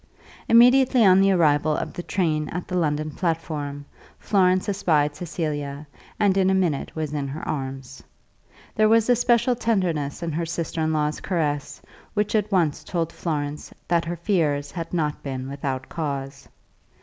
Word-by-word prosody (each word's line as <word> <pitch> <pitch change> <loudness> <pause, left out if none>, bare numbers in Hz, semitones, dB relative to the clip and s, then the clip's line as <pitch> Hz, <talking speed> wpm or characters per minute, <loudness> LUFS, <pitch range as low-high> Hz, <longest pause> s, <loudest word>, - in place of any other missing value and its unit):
Immediately 250 +1 +6
on 190 0 +6
the 195 - +4
arrival 155 -3 +3
of - - -4
the - - -5
train 160 -5 -1
at 180 +1 -5
the 180 - -4
London 155 -3 0
platform, 150 -4 -3 0.3
Florence 185 -2 +2
espied 155 -7 +1
Cecilia, 150 -4 -4 0.3
and 200 -2 +3
in 190 -1 +3
a 190 - +3
minute 170 -7 -1
was 155 -2 -3
in 145 -2 -2
her 145 +4 -6
arms. 135 -2 -5 0.7
There 215 0 +3
was 225 +1 +4
a - - +5
special 240 +1 +2
tenderness 180 -10 -1
in 165 - -2
her 165 +3 -2
sister 165 0 -3
in 160 0 +1
law's 150 -1 0
caress, 150 -6 -2 0.3
which 210 0 0
at 210 -1 +1
once 170 -6 +1
told 165 -2 -2
Florence 150 -3 -4 0.2
that 170 -1 +1
her 170 +1 -3
fears 160 -6 0
had 165 -2 -6
not 155 -4 -1
been 130 -2 -5
without 135 -1 -4
cause. 140 -3 -5
165 Hz, 160 wpm, -24 LUFS, 145-190 Hz, 0.7 s, Immediately